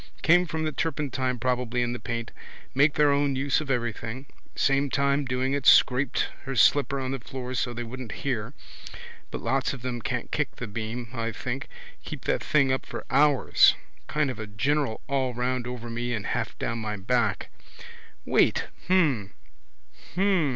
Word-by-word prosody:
Came 175 +2 +5
from 160 0 -2
the 155 - 0
turpentine 135 -6 -1
probably 125 0 0
in 120 0 -1
the 120 - -5
paint. 115 -1 -4 0.4
Make 140 +2 +4
their 150 -1 +4
own 140 -1 +2
use 135 +3 +1
of 150 - -7
everything. 120 0 -2 0.3
Same 135 +1 +2
time 140 +1 +1
doing 130 +1 0
it 140 -1 -1
scraped 130 +1 +5 0.2
her 135 -1 -4
slipper 140 +3 +4
on 130 -1 -3
the 135 - -2
floor 130 +1 -6
so 125 -1 -1
they 120 0 -4
wouldn't 120 -1 -7
hear. 125 -1 -2 0.7
But - - -5
lots 135 0 0
of 125 -3 -9
them 125 -2 -3
can't - - -3
kick - - -1
the - - -5
beam, 110 +3 -5
I 115 -2 -2
think. 125 +5 -4 0.4
Keep - - -7
that - - 0
thing 140 -4 +3
up 130 - -1
for - - -6
hours. 140 0 +5 0.3
Kind 150 -3 0
of 120 - -9
a 110 - -5
general 135 +3 0
all 130 -4 0
round 125 0 -1
over 125 -1 -6
me 120 +1 -2
and 105 - -5
half - - -2
down 115 - -2
my 105 -2 -3
back. 115 +2 0 0.8
Wait. - - +2 0.2
Hm. 145 - +2 0.8
Hm. 190 -5 +3
130 Hz, 175 wpm, -27 LUFS, 120-140 Hz, 0.8 s, Came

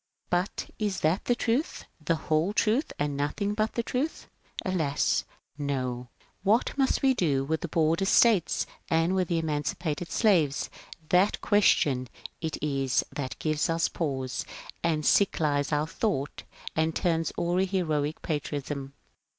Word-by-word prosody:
But 180 +2 -1
is 205 -3 -1
that 160 +5 +1
the 245 - +2
truth, 240 +6 -1 0.2
the 165 - +2
whole 160 +4 0
truth, 230 +7 +1
and 145 -1 -1
nothing^ 200 +8 -1
but 215 +1 0
the 235 - -1
truth? 265 +7 -2 0.4
Alas, 160 -7 +1 0.3
no! 130 -4 -2
^^ - - -30
What 210 +5 +2
must 270 -1 +1
we 265 -1 +5
do 145 - +1
with 160 +2 -1
the - - -3
Border 165 +3 +2
States 205 -3 +4 0.2
and 165 +2 +2
with 185 -2 +1
the 170 - 0
Emancipated 155 +1 -2
Slaves? 170 - +2
" - - -13
— 155 - -28
that 185 +3 +3
question 145 -11 +3 0.3
it 160 -1 -2
is 135 -3 +1
that 135 -3 -4
^^ - - -34
gives 155 0 0
us 165 0 +1
pause 135 -6 -2 0.2
" - - -16
and 155 -3 +1
sick 200 - +3
lies 145 -2 +1
our 150 0 +2
thought, 160 - -2 0.3
and 160 0 +1
turns 165 -3 +1
awry 175 +2 +1
heroic 155 -6 -1
patriotism. 145 -2 -3
160 Hz, 160 wpm, -28 LUFS, 145-195 Hz, 0.4 s, we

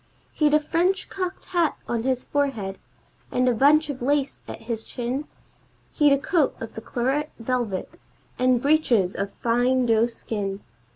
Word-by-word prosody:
He'd 300 -1 +3
a - - +6
French 350 +5 0
cocked 370 -1 -4
hat 340 -4 +2
on 235 -1 -1
his 255 +1 -1
forehead, 235 -10 -1 0.5
and 250 0 +2
a 250 - +4
bunch 290 +6 +4
of 280 -4 -5
lace 280 +2 0
at - - -8
his 225 -1 -4
chin; 250 +4 -3 0.7
He'd 295 -2 +4
a 280 - +5
coat 305 +1 +1
of 225 - -7
the 220 - -7
claret 265 +6 -1
velvet, 230 -5 -3 0.4
and 255 -1 +3
breeches 250 - +3
of 200 0 -3
fine 245 +2 +2
doe 225 0 +3
skin. 205 -4 -4
255 Hz, 160 wpm, -24 LUFS, 230-295 Hz, 0.7 s, a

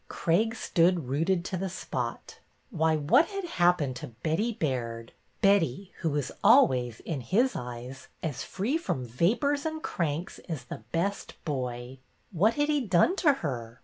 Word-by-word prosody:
Craig 215 +7 +1
stood 170 - +2
rooted 170 +6 +1
to 190 - -3
the 190 +1 -2
spot. 185 - -5 0.3
Why, 160 -4 +2
what 175 - +4
had 395 -2 -4
happened 175 - +2
to 150 - -7 0.2
Betty 170 +9 +1
Baird, 120 - -3 0.2
— - - -40
Betty, 195 -2 +3
who 165 - 0
was 145 -3 -2
always, 125 - +5
in 150 -5 -4
his 230 - +2
eyes, 125 +2 -7 0.2
as 145 -4 -3
free 240 - -1
from 170 - -2
vapors 235 - +1
and 315 0 -4
cranks 165 +1 -2
as 155 -7 -4
the 120 - -8
best 195 +5 -2
boy? 125 -3 -4 0.3
What 205 +6 +3
had 290 0 +1
he 295 -2 +2
done 205 - +3
to 305 - +5
her? 120 -3 -4
165 Hz, 160 wpm, -28 LUFS, 130-210 Hz, 0.3 s, always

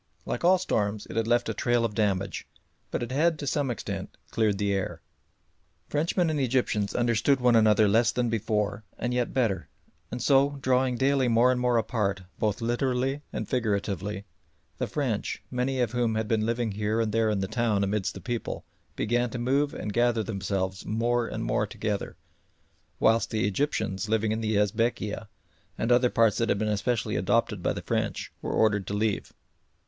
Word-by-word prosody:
Like 120 - -3
all 185 +2 +6
storms 105 - -1
it - - -8
had 115 0 0
left 120 +1 +2
a - - -1
trail 120 -1 +1
of 110 - -2
damage, 100 -3 -1 0.4
but - - -2
it 120 - -5
had 160 +4 +2
to 145 - -5
some 140 -1 0
extent 120 - -5
cleared 110 -3 +1
the 100 0 0
air. 95 -4 -2 0.9
Frenchmen 165 +3 +1
and 150 - -1
Egyptians 120 -6 0
understood 120 +3 +2
one 125 -1 +4
another 110 -1 +5
less 110 +3 +4
than 125 -1 0
before 110 -2 -1
and 120 0 -2
yet 125 -1 0
better; 115 -7 0 0.4
and 125 - -5
so 140 +2 +3
drawing 130 -1 +1
daily 135 0 +2
more 120 +2 +4
and 125 -1 0
more 125 -1 +3
apart, 105 -4 -1 0.2
both 105 +1 0
literally 130 +3 0
and - - -4
figuratively, 100 -4 -2 0.5
the - - -1
French 125 -8 -2
many 130 +1 -1
of 120 -3 +1
whom 120 -2 0
had 110 -1 -1
been 110 0 +1
living 115 -1 0
here 105 +2 -1
and 110 -2 0
there 115 0 +2
in 105 -2 0
the 95 - -1
town 110 -3 +1
amidst 100 0 -1
the - - -8
people 120 -1 -4 0.3
began 120 +2 0
to 125 - -5
move 135 +4 +1
and 105 - -5
gather 120 -1 +2
themselves 95 -2 -2
more 120 +2 0
and - - -4
more - - 0
together, - - -3 0.8
whilst 115 -1 +3
the 110 -2 0
Egyptians 110 -4 -1
living 110 -1 +1
in 110 +1 -1
the 110 -1 0
Esbekieh 105 +1 0 0.5
and 115 - 0
other 125 0 +5
parts 115 -3 +3
that 115 - +1
had - - +2
been 105 0 0
specially 115 +3 -1
adopted - - +1
by - - +1
the - - -5
French - - -2
were - - -3
ordered 105 -3 +2
to 100 - -2
leave. 105 -1 -1
115 Hz, 185 wpm, -27 LUFS, 105-125 Hz, 0.9 s, all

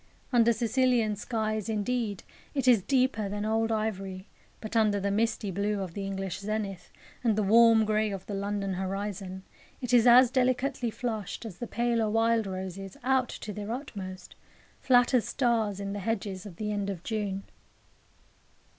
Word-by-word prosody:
Under 235 -1 +5
Sicilian 235 -1 +2
skies, 215 0 -2
indeed, 215 -1 -1 0.3
it 270 -2 0
is 235 -5 +6
deeper 255 -3 +1
than 205 +1 -3
old 225 +1 +1
ivory; 195 -4 -3 0.3
but 220 +1 -7
under 215 -2 +3
the 200 +1 -1
misty 215 -1 0
blue 200 +2 -1
of 185 -4 -5
the 195 +1 -4
English 195 -2 -4
zenith, 200 -2 -4 0.3
and 225 -3 +3
the 215 - +1
warm 225 +1 +6
grey 215 0 +1
of 195 -2 -6
the 205 - -6
London 200 0 -2
horizon, 190 0 -4 0.4
it 250 -2 -3
is 240 0 +6
as 245 +1 +8
delicately 255 -1 +1
flushed 220 -2 -4
as 205 -6 -8
the 240 - -4
paler 235 -1 0
wild 225 0 +2
roses, 190 0 -6
out 260 -1 +2
to 210 - -6
their 210 +2 -5
utmost, 200 -8 -6 0.5
flat 245 0 +4
as 240 -5 +3
stars, 225 -6 +1
in 200 0 -4
the 205 - -4
hedges 200 -2 -3
of 185 - -11
the 210 +3 -3
end 205 -1 -2
of 185 -3 -5
June. 205 -3 -2
215 Hz, 165 wpm, -29 LUFS, 195-230 Hz, 0.5 s, as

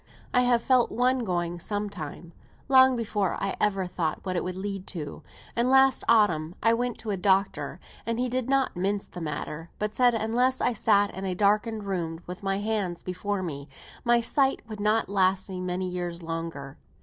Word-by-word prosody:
I 250 - +5
have 245 -2 +3
felt 255 -2 +3
one 255 +2 +2
going 175 -5 -2
some 205 +3 -2
time, 165 -2 -8 0.3
long 260 -1 +6
before 210 -5 -1
I 195 - -2
ever 195 -3 +1
thought 175 -3 -2
what 185 -1 -2
it - - 0
would 180 0 -4
lead 195 0 -5
to; 155 -6 -6 0.3
and 235 +2 +2
last 265 0 +5
autumn 175 -8 +3
I 230 +1 +5
went 245 +1 -1
to 215 - -3
a 195 - -1
doctor; 195 +1 +1 0.2
and 230 0 -2
he 250 +1 0
did 255 0 -2
not 270 -1 +2
mince 195 +3 -1
the 180 - -9
matter, 155 +1 -5
but 210 0 -2
said 245 -1 +4
unless 240 +4 +1
I 245 - +2
sat 205 -2 +2
in 190 +1 -5
a 185 -1 -1
darkened 210 +3 +1
room, 170 -4 -3
with 180 +1 -7
my 195 -1 0
hands 205 -4 -2
before 185 +2 -3
me, 140 -4 -5 0.4
my 240 -1 +4
sight 270 +3 +2
would 215 -2 -7
not 215 +2 +2
last 190 -1 +1
me 185 -1 -4
many 185 +1 -2
years 175 -1 -4
longer. 165 -4 -5
200 Hz, 195 wpm, -27 LUFS, 180-230 Hz, 0.4 s, long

